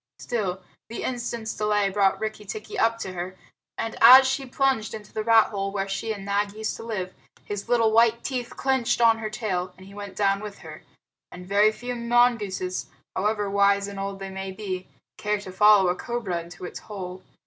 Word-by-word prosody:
Still, 195 -6 -3 0.3
the 230 - -5
instant's 235 -3 -3
delay 210 -2 +1
brought 195 -1 +2
Rikki 215 -1 -4
tikki 210 +1 -7
up 230 0 +2
to 190 - -5
her, 180 +1 -5 0.4
and 225 - -3
as 260 +3 +10
she 270 0 -1
plunged 260 -4 0
into 210 -2 -11
the 215 - -2
rat 225 -1 +5
hole 195 -1 -2
where 195 -1 -2
she 195 +3 -3
and 200 -3 -6
Nag 200 0 0
used 220 0 -3
to - - -9
live, 190 -5 -4 0.3
his 205 +2 -5
little 230 -2 +3
white 230 +1 +4
teeth 250 -3 -3
were - - -13
clenched 265 -3 +1
on 230 -1 +5
her 215 -1 -3
tail, 185 -5 -3
and 190 - -13
he 195 - -13
went 200 -2 -8
down 195 0 +2
with 205 -1 -8
her 155 -1 -9 0.5
and 180 0 -10
very 205 +3 +4
few 245 +3 -5
mongooses, 235 -6 +1 0.3
however 210 +1 0
wise 200 0 +3
and 200 -1 -7
old 195 0 -4
they 195 0 -7
may 190 0 -5
be, 190 -2 -5 0.3
care 210 0 -1
to 195 -2 -9
follow 205 0 +6
a 180 - +3
cobra 210 -7 -3
into 175 +2 -10
its - - -7
hole. 185 -3 -7
210 Hz, 205 wpm, -25 LUFS, 195-225 Hz, 0.5 s, as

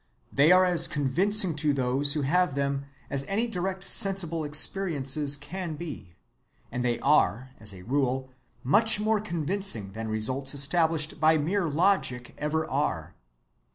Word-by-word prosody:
They 145 +5 +4
are 185 0 +5
as 175 -2 +3
convincing 170 +6 +2
to 150 -1 +1
those 135 +2 +1
who 150 -1 -2
have 175 +1 +1
them 140 0 -2 0.3
as 140 -1 -2
any 215 +4 -1
direct 190 -3 -4
sensible 190 -6 0
experiences 150 -2 +2
can 165 +3 -6
be, 140 - -9 0.6
and 125 - -3
they 120 -1 -1
are, 130 -2 +1
as 110 -1 -4
a 95 -2 -12
rule, 130 +2 -2 0.3
much 210 - +3
more 215 0 0
convincing 170 - -1
than 110 +2 -6
results 130 +6 0
established 155 +2 +2
by 160 +1 +4
mere 170 +5 -1
logic 150 -6 0
ever 155 +1 -2
are. 90 - -3
150 Hz, 145 wpm, -26 LUFS, 135-180 Hz, 0.6 s, are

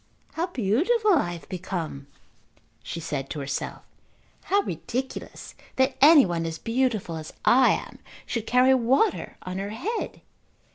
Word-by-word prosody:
"How 335 +2 -1
beautiful 360 - +2
I 225 - +1
have 170 -4 -10
become," 170 -6 -5 0.7
she 170 - -6
said 140 -4 -4
to 150 - -5
herself. 135 -1 -4 0.6
"How 400 +1 +3
ridiculous 245 - -5 0.2
that 260 +1 +2
any 295 0 +8
one 170 -2 -2
as 160 0 -4
beautiful 230 -8 -1
as 155 0 -8
I 255 +1 +6
am - - -6 0.3
should 230 -2 -3
carry 255 +2 +5
water 260 - +1
on 185 +1 -5
her 200 +1 -4
head." 375 - -4
230 Hz, 140 wpm, -25 LUFS, 170-265 Hz, 0.7 s, any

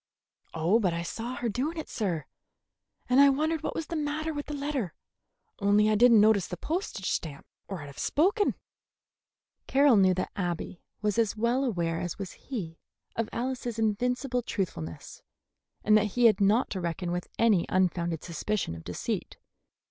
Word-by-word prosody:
"Oh, 170 +8 +3
but 185 -6 +1
I 170 - -2
saw 230 +8 -5
her 240 - -2
doing 265 +10 -2
it, 315 - -4
sir, 180 - -2 0.8
and 255 +2 +4
I 280 0 +8
wondered 310 +3 0
what - - -3
was 325 - -2
the 335 - -5
matter 310 +1 -2
with 290 -1 -5
the 295 - -4
letter; 280 - -3 0.6
only 205 +1 +4
I - - +3
did 245 +3 +6
n't 230 - +7
notice 210 -3 +4
the 180 - -6
postage 315 - -3
stamp, 150 -2 -4 0.2
or 185 -6 -5
I'd - - -8
have 140 0 -11
spoken." 400 +7 +2 1.1
Carroll 275 -3 +5
knew 185 -2 +5
that 185 - -2
Abby 175 -2 -3 0.2
was 210 +2 +1
as 225 -1 +1
well 235 +4 +1
aware 170 -9 -1
as 175 -2 -4
was 195 -2 -5
he 180 -12 -7 0.4
of 230 -1 -1
Alice's 245 -1 -3
invincible 245 +4 0
truthfulness, 125 - -5 0.6
and 215 - +5
that 215 -1 +4
he 245 - +5
had 220 -2 +5
not 210 +6 +3
to 190 - -3
reckon 175 +1 -3
with 175 0 -3
any 215 -7 +3
unfounded 175 -3 0
suspicion 175 - -2
of 80 0 -9
deceit. - - -4
215 Hz, 175 wpm, -28 LUFS, 180-255 Hz, 1.1 s, I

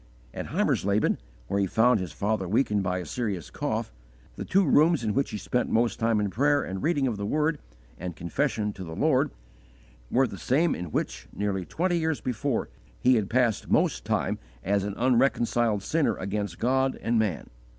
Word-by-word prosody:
At - - -5
Heimersleben, 100 +2 +1 0.3
where 100 - -1
he 100 - +2
found 115 +3 +3
his 90 -4 -4
father 100 +3 -1
weakened 105 0 +2
by 90 -1 -1
a 90 - -4
serious 100 -2 -3
cough, - - -3 0.4
the - - -5
two 195 +1 +3
rooms 155 0 +4
in 105 -2 0
which 140 +5 +1
he - - -4
spent 120 +5 -1
most 115 +1 +1
time 115 -1 +2
in 105 -2 -1
prayer 145 +6 +2
and 95 0 -5
reading 150 -3 +1
of 120 -5 -1
the 100 - -3
Word, 150 +3 +1 0.4
and 90 0 -5
confession 105 - -1
of 95 -3 -7
the 80 - -6
Lord, - - +2 0.8
were 135 +2 +3
the 100 -6 -7
same 150 - +2
in 90 - -4
which, 75 -6 -3
nearly 100 -2 -2
twenty 175 - 0
years 160 -2 0
before, 125 +1 -1 0.3
he 130 - +4
had 110 -4 +1
passed 120 -3 +1
most - - +2
time - - -1 0.2
as 100 +1 +1
an 100 0 -3
unreconciled 120 -4 +2
sinner 145 -7 +1
against 100 -2 -3
God 130 +2 +1
and 115 0 +1
man. 105 -7 -2
110 Hz, 185 wpm, -27 LUFS, 100-130 Hz, 0.8 s, rooms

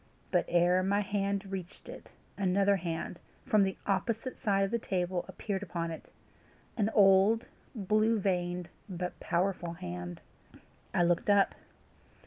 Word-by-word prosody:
But - - +2
ere 175 +1 +3
my 200 +2 +2
hand 200 0 -1
reached 190 -1 -7
it, - - -10 0.3
another 200 +1 +2
hand, 170 -1 -4 0.3
from 215 - +4
the 190 -1 +1
opposite 225 +5 -1
side 195 -2 +2
of 195 - -1
the 235 - +1
table, 180 -3 -1
appeared 195 -3 -4
upon 170 -3 -3
it 160 - -9 0.6
an 215 -2 +1
old, 200 +3 +5 0.3
blue 215 +2 +2
veined, 180 -3 -1 0.2
but 180 -1 -4
powerful 175 -1 -1
hand. 90 - -6 0.7
I 175 - +2
looked 175 +3 +1
up. 200 -1 +4
190 Hz, 135 wpm, -31 LUFS, 175-200 Hz, 0.7 s, old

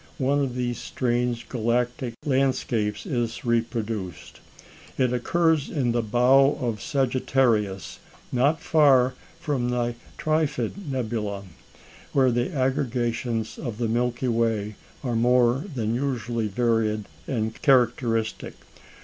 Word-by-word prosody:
one 140 +2 +1
of 135 -3 -1
these 120 -1 -2
strange 120 -1 -1
galactic 120 +1 -1
landscapes 130 -6 0
is 120 -2 -2
reproduced. 115 -5 -2 0.6
It 125 -2 +2
occurs 160 +4 +1
in 130 -6 0
the 120 0 +1
Bow 125 +5 +4
of 115 -6 -2
Sagittarius, 125 -7 0 0.3
not 140 +6 +2
far 135 -5 +4 0.3
from 140 -7 -1
the 120 -1 0 0.2
Trifid 155 - -1
nebula, 110 -6 -2 0.7
where 130 -2 +4
the 120 +1 0
aggregations 125 -4 -1
of 115 -5 -5
the 120 -1 0
Milky 120 +2 0
Way 115 -3 0 0.3
are 120 -3 -1
more 125 +4 +3
than 110 -2 -1
usually 120 -3 -1
varied 110 -1 0 0.2
and 110 -3 -2
characteristic. 120 -4 +2
120 Hz, 110 wpm, -25 LUFS, 115-130 Hz, 0.7 s, Bow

